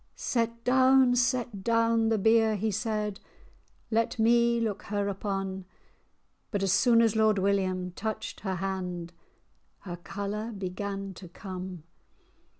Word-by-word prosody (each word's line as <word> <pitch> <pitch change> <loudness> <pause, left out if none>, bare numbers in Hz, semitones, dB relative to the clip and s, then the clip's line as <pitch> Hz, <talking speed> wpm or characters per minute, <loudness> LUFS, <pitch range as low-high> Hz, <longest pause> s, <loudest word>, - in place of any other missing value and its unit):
"Set 230 -1 -1
down, 260 0 +5
set 240 -5 0
down 230 0 +2
the 225 - +2
bier," 220 +1 +4
he 215 +2 -1
said, 210 -1 -2 0.7
"Let 230 +2 +1
me 235 +1 +4
look 215 -3 -2
her 205 -1 -1
upon;" 195 -1 -3 0.8
But 200 -3 -1
as 195 - +2
soon 230 -2 +5
as 225 -1 +2
Lord 220 -1 +3
William 190 -2 0
touched 215 +4 -5
her 190 -2 -3
hand, 180 -2 -4 0.7
Her 175 -3 -7
colour 205 +5 -5
began 195 0 -4
to 180 0 -11
come. 185 -2 -7
210 Hz, 130 wpm, -28 LUFS, 190-230 Hz, 0.8 s, down